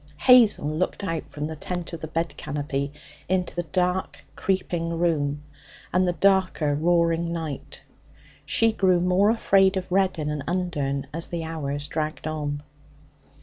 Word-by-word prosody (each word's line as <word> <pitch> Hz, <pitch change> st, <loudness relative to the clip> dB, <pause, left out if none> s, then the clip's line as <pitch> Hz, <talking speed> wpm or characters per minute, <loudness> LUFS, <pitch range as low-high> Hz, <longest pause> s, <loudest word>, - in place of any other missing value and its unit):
Hazel 235 Hz, -, +6 dB
looked 155 Hz, +6 st, -2 dB
out 165 Hz, -4 st, -3 dB
from 150 Hz, 0 st, -4 dB
the 160 Hz, +1 st, -4 dB
tent 175 Hz, +2 st, -5 dB
of 165 Hz, -, -6 dB
the 160 Hz, -, -4 dB
bed 165 Hz, +1 st, -2 dB
canopy 145 Hz, -1 st, -3 dB, 0.4 s
into 185 Hz, -1 st, 0 dB
the 175 Hz, -, 0 dB
dark, 180 Hz, +2 st, -1 dB
creaking 180 Hz, -3 st, -1 dB
room 150 Hz, -4 st, 0 dB, 0.5 s
and 185 Hz, +1 st, +3 dB
the 175 Hz, -, +1 dB
darker, 185 Hz, -6 st, +2 dB
roaring 170 Hz, +2 st, +2 dB
night. 160 Hz, -5 st, -6 dB, 0.6 s
She 225 Hz, 0 st, +2 dB
grew 185 Hz, -4 st, +3 dB
more 180 Hz, +3 st, +3 dB
afraid 195 Hz, -4 st, +3 dB
of 185 Hz, -1 st, -5 dB
Reddin 185 Hz, -5 st, +1 dB
and 150 Hz, -2 st, -3 dB
Undern 155 Hz, -6 st, -1 dB
as 165 Hz, +1 st, 0 dB
the 170 Hz, -1 st, -4 dB
hours 145 Hz, -3 st, -4 dB
dragged 155 Hz, 0 st, -3 dB
on. 145 Hz, -2 st, -3 dB
170 Hz, 145 wpm, -25 LUFS, 150-185 Hz, 0.6 s, Hazel